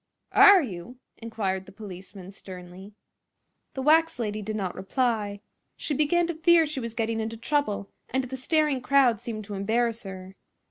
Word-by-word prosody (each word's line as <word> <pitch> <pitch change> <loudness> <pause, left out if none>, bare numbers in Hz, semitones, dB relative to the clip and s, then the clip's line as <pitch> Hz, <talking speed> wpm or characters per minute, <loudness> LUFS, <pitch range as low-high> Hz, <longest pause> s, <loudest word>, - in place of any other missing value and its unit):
"Are 400 -3 +8
you?" 220 +2 -7 0.2
inquired 200 -5 -3
the - - -11
policeman, 195 -2 -10
sternly. 190 +1 -11 0.8
The 265 - -3
wax 325 +1 +4
lady 215 -3 -3
did 215 +1 -4
not 190 -4 -2
reply. 205 0 -1 0.4
She 300 - -2
began 305 +5 +2
to 340 - -2
fear 330 +1 +4
she 300 -2 -4
was 230 -2 -6
getting 225 0 -1
into 225 +1 -4
trouble, 225 -6 -1 0.2
and 265 0 0
the 255 +1 -6
staring 295 0 +1
crowd 255 -4 +3
seemed 215 -2 -5
to 205 - -7
embarrass 230 +4 0
her. 190 -1 -9
225 Hz, 165 wpm, -26 LUFS, 200-275 Hz, 0.8 s, Are